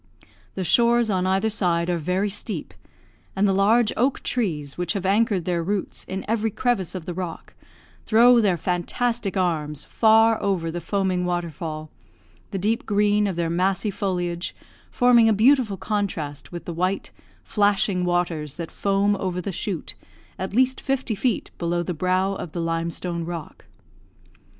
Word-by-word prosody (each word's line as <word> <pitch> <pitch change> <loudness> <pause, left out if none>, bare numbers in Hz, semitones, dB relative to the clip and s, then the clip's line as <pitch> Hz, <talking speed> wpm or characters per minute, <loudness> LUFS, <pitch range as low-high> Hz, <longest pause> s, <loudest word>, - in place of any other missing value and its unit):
The 190 - -2
shores 235 +3 +3
on 185 -1 +1
either 195 +4 +1
side 175 -5 0
are 175 -1 0
very 185 +5 0
steep, 205 -4 -4 0.6
and 195 +1 +3
the 195 - +2
large 210 +4 +3
oak 255 +4 0
trees 155 - -2
which 175 +1 -2
have 195 -3 -3
anchored 200 -2 +2
their 175 -2 0
roots 195 +3 -3
in 190 +1 -5
every 225 0 +1
crevice 215 -5 -1
of 180 -4 -5
the 175 - -4
rock, 175 -2 -6 0.5
throw 235 +2 +6
their 195 -5 +2
fantastic 195 +5 -1
arms 150 -5 -1
far 225 0 +4
over 180 -5 0
the 175 +1 -4
foaming 190 -2 0
waterfall, 165 -3 -4 0.6
the 195 - -4
deep 215 +5 -1
green 205 0 +2
of 190 - -2
their 165 -1 -1
massy 190 +4 +1
foliage 175 -3 -2 0.3
forming 240 -3 +5
a - - +4
beautiful 225 -1 +3
contrast 180 -9 -3
with 175 -1 -7
the 170 - -4
white, 185 +4 -1 0.3
flashing 205 -3 +1
waters 175 -5 -1
that 170 -2 -6
foam 200 +1 +1
over 185 -2 -2
the 185 +2 -3
shoot 185 -1 -4 0.5
at 190 +2 -4
least 260 +1 +2
fifty 265 -4 -1
feet 230 +1 -1
below 175 0 0
the 180 - -3
brow 185 +4 +1
of 170 -4 -7
the 175 - -3
limestone 165 +1 -2
rock. 170 -2 -7
190 Hz, 160 wpm, -24 LUFS, 175-210 Hz, 0.6 s, throw